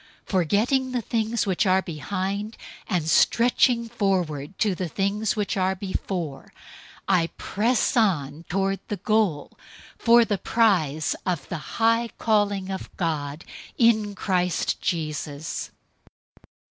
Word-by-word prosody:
Forgetting 220 - +1
the 245 - 0
things 225 0 0
which 195 +1 +1
are 185 +1 +3
behind, 195 +6 -4 0.3
and 170 -4 -1
stretching 235 +5 +3
forward 185 -8 -1
to 210 -3 +2
the 180 0 -3
things 200 +4 0
which 210 -3 -1
are 190 0 +1
before, 185 -6 -4 0.6
003:014 185 -2 +4
I 165 - 0
press 230 +4 0
on 165 - +1
toward 195 +1 0
the 205 - -3
goal 210 -10 0 0.5
for 235 0 +6
the 205 -4 -1
prize 165 -10 +2
of 170 -7 -2
the 170 - -3 0.2
high 230 +1 +3
calling 205 -3 +1
of 190 - -5
God 155 -3 -2 0.3
in 215 -4 +3
Christ 180 -3 0
Jesus. 155 -2 -3
195 Hz, 120 wpm, -25 LUFS, 170-220 Hz, 0.6 s, for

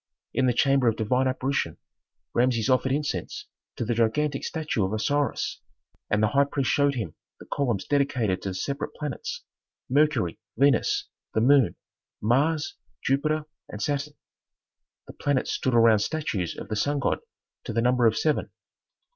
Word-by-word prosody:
In 130 - +2
the 125 - +3
chamber 135 -2 +3
of 115 - +3
"divine 125 +4 +1
apparition" 130 - -1 0.6
Rameses 120 0 +2
offered 130 +1 +2
incense 140 - -2 0.3
to 120 - -3
the 120 - 0
gigantic 135 +6 +1
statue 155 - -1
of 95 +2 -1
Osiris, 140 +4 -1 0.5
and 105 +1 +2
the 105 - +4
high 140 +3 +4
priest 140 -1 -1
showed 140 -1 +3
him 105 -10 -4 0.3
the - - -11
columns 120 -9 -1
dedicated 125 -10 +1
to 95 - -3
the 95 - -5
separate 140 +9 -3
planets: 150 -5 -5 0.5
Mercury, 135 - +2 0.2
Venus, 140 0 +3 0.3
the 110 - +3
moon, 135 0 +5 0.4
Mars, 145 +8 +1 0.3
Jupiter, 155 +3 +1 0.2
and 105 - -7
Saturn. 145 +3 -2 0.9
The - - -11
planets 145 -2 0
stood 130 -2 0
around 115 -2 +6
statues 105 - -2
of - - -8
the 110 - -1
sun 145 +8 0
god 140 - 0 0.5
to - - -3
the 115 - 0
number 125 -1 +4
of 110 - +2
seven. 155 -1 +1
130 Hz, 155 wpm, -26 LUFS, 110-145 Hz, 0.9 s, around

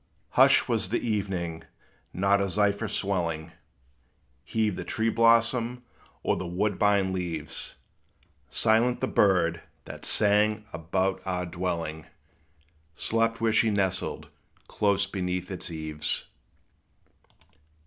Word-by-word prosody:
Hush - - +5
was - - -1
the - - +1
evening; 95 -6 -2 0.5
not 100 +2 +2
a 100 - 0
zephyr 105 +3 +1
swelling 85 -6 -2 0.9
Heaved 110 -3 0
the - - -5
tree 110 +1 -1
blossom, 115 +2 +3 0.4
or - - +2
the 90 - -4
woodbine 100 +1 +1
leaves; 80 -4 -4 0.7
Silent 115 +3 +2
the - - 0
bird, 85 -4 +2 0.2
that - - -9
sang 105 +1 +3
about 95 +3 -1
our 90 -1 -2
dwelling, 85 -3 -4 0.9
Slept 115 +4 0
where 115 -1 +2
she 110 0 +4
nestled, 95 -3 -1 0.4
close 100 -1 +1
beneath 90 -1 -3
its 95 - -6
eaves. 75 -2 -3
95 Hz, 105 wpm, -27 LUFS, 85-105 Hz, 0.9 s, Hush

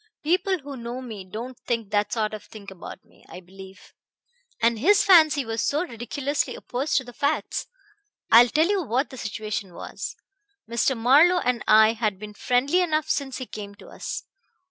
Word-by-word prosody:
People 370 +4 +1
who 285 -3 -9
know 240 0 -6
me 225 -6 -8
don't 235 +7 -8
think 230 -4 -2
that 205 0 +1
sort 215 -2 -1
of 215 - -7
thing 200 -3 -11
about 185 - -11
me, - - -25
I - - -9
believe. 190 +1 -14 0.7
And 230 -1 +2
his 400 - +4
fancy 310 -7 +5
was 225 0 -2
so 300 +4 0
ridiculously 280 +2 -3
opposed 265 +5 -2
to 265 - +1
the 245 -1 -12
facts. 285 +4 -2 0.6
I 230 +1 +10
will 240 - +3
tell 310 +5 +3
you 400 -1 +1
what 265 0 -1
the 260 - -9
situation 210 -4 -5
was. - - -7 0.5
Mr. 235 +2 0
Marlowe 290 +10 +5
and 250 -1 -1
I 220 +1 +6
had 215 -4 -1
been 210 +1 -9
friendly 255 - +1
enough 310 -3 0
since 270 -2 -2
he 255 - -5
came 205 -3 -9
to - - -15
us. - - -6
245 Hz, 185 wpm, -24 LUFS, 215-285 Hz, 0.7 s, I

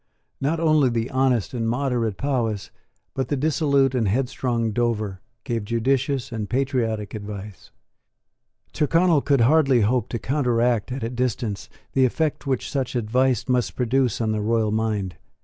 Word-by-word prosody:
Not 155 +4 0
only 155 -5 +4
the 115 0 -2
honest 130 -5 +1
and 115 -2 -1
moderate 120 -5 -1
Powis, 115 -5 -1 0.4
but 135 - -2
the 145 - 0
dissolute 140 -2 +2
and 120 -5 +1
headstrong 120 0 0
Dover, 110 -4 -1 0.2
gave 115 -5 -2
judicious 130 +4 0
and 110 -3 -4
patriotic 120 -6 -1
advice. 105 -2 -8 1.0
Tyrconnel 165 0 +3
could 140 -3 +2
hardly 135 -1 +4
hope 115 +2 +1
to 120 - -2
counteract 120 -3 0
at 130 0 -4
a 115 - -1
distance 120 -4 -2 0.2
the 130 -1 +4
effect 150 +3 -1
which 130 -2 -1
such 135 -3 -2
advice 125 +1 +1
must 125 -2 0
produce 125 -1 +1
on 110 -2 0
the 105 -1 -1
royal 110 0 +1
mind. 105 -5 -1
125 Hz, 150 wpm, -23 LUFS, 110-135 Hz, 1.0 s, only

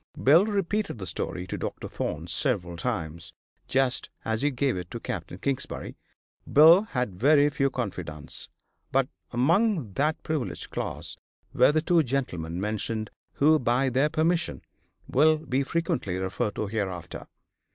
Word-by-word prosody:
Bill 165 +9 +6
repeated 205 - -1
the 95 - -6
story 90 +1 -4
to - - -5
Dr. - - -4
Thorne 80 +2 -4
several 90 - 0
times, 85 -4 -4 0.3
just 130 -1 +1 0.2
as 110 0 -1
he 145 - +3
gave 135 -1 0
it 90 -1 -5
to - - -6
Capt. - - -5
Kingsbury. 135 -2 -3 0.6
Bill 160 +6 +8
had 125 - -3
very 145 +3 +5
few 135 -1 +1
confidants, 90 - -4 0.4
but 135 0 +2 0.2
among 160 - +2
that 150 +8 0
privileged 155 -6 -3
class - - -3 0.4
were - - +5
the 155 +1 +1
two 170 0 +4
gentlemen 90 - -2
mentioned, 110 +1 -2 0.2
who, 155 +2 +4
by 125 +2 +2
their 135 +4 +2
permission, 160 - 0 0.4
will 155 +4 +4
be 140 -4 -1
frequently 135 - -1
referred 95 +2 -2
to 110 - -2
hereafter. 100 -5 -4
130 Hz, 140 wpm, -27 LUFS, 95-155 Hz, 0.6 s, Bill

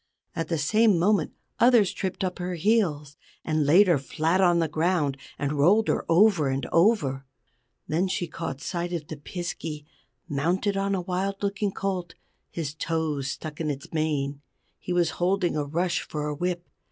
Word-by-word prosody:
At 165 -1 -2
the 165 - -1
same 210 +6 +3
moment 200 +4 +2 0.3
others 235 -5 +5
tripped 190 0 -3
up 185 -1 -2
her 180 0 -3
heels, 160 -7 +1 0.3
and 155 -2 +1
laid 180 +8 +7
her 170 -6 +4
flat 160 +7 0
on 175 -2 +4
the 165 -1 +2
ground, 155 -2 0 0.2
and 145 -1 -1
rolled 205 +9 +4
her - - 0
over 170 -4 +4
and 135 +1 -2
over. 165 - +3 0.6
Then 170 +5 +1
she 185 -1 -1
caught 140 -4 -6
sight 175 -1 -3
of 165 -3 -3
the 155 - -7
Piskey 155 -1 -6 0.4
mounted 175 +7 0
on 195 0 0
a 185 - -1
wild 190 +3 -3
looking 200 0 0
colt, 185 -3 -3 0.3
his 155 -4 -4
toes 155 -4 -2
stuck 155 +3 -6
in 155 - -1
its 140 +1 -6
mane. 145 -3 -1 0.4
He - - -6
was 175 -1 +2
holding 180 -1 +1
a 150 - 0
rush 170 +4 0
for 150 -1 -5
a - - -2
whip. 175 +2 -3
170 Hz, 175 wpm, -26 LUFS, 150-190 Hz, 0.6 s, laid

